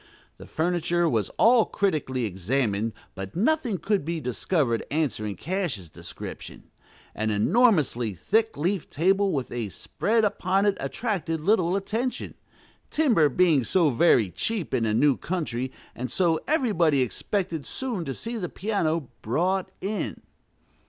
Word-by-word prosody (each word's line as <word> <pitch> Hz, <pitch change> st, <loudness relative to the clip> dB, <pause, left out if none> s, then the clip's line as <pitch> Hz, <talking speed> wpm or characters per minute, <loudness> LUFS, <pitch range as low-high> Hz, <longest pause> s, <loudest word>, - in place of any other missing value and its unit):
The -, -, -12 dB
furniture 175 Hz, +1 st, 0 dB
was 110 Hz, -, 0 dB
all 230 Hz, 0 st, +6 dB
critically 140 Hz, -10 st, -1 dB
examined, 105 Hz, +2 st, -1 dB, 0.2 s
but 95 Hz, 0 st, -7 dB
nothing 240 Hz, -, +1 dB
could 200 Hz, +3 st, 0 dB
be 165 Hz, +2 st, -2 dB
discovered 125 Hz, -1 st, 0 dB
answering 125 Hz, -9 st, -1 dB
Cash's 160 Hz, -, -3 dB
description. -, -, -9 dB, 0.5 s
An 110 Hz, 0 st, -1 dB
enormously 125 Hz, -, +2 dB
thick 220 Hz, -, +1 dB
leafed 175 Hz, +4 st, -1 dB
table 190 Hz, +5 st, +2 dB
with 135 Hz, -6 st, -2 dB
a 115 Hz, -4 st, -3 dB
"spread" 220 Hz, -, 0 dB
upon 195 Hz, -1 st, +1 dB
it 205 Hz, -1 st, +3 dB
attracted 165 Hz, -, -2 dB
little 185 Hz, -1 st, +2 dB
attention, 225 Hz, +6 st, -2 dB, 0.6 s
timber 235 Hz, -, +3 dB
being 155 Hz, -2 st, +3 dB
so 160 Hz, -, +3 dB
very 115 Hz, -, +4 dB
cheap 190 Hz, -, -2 dB
in 115 Hz, -3 st, +1 dB
a 105 Hz, -, +1 dB
new 140 Hz, +2 st, +4 dB
country, 130 Hz, -8 st, -3 dB, 0.2 s
and 125 Hz, +1 st, -5 dB
so 165 Hz, +2 st, +2 dB
everybody 175 Hz, -, +2 dB
expected 165 Hz, -, -3 dB
soon 245 Hz, -9 st, -3 dB
to 135 Hz, -, -3 dB
see 230 Hz, +1 st, -5 dB
the 180 Hz, -5 st, -3 dB
piano 165 Hz, -, -1 dB
"brought 180 Hz, -, 0 dB
in." 205 Hz, +3 st, -3 dB
165 Hz, 135 wpm, -26 LUFS, 125-200 Hz, 0.6 s, all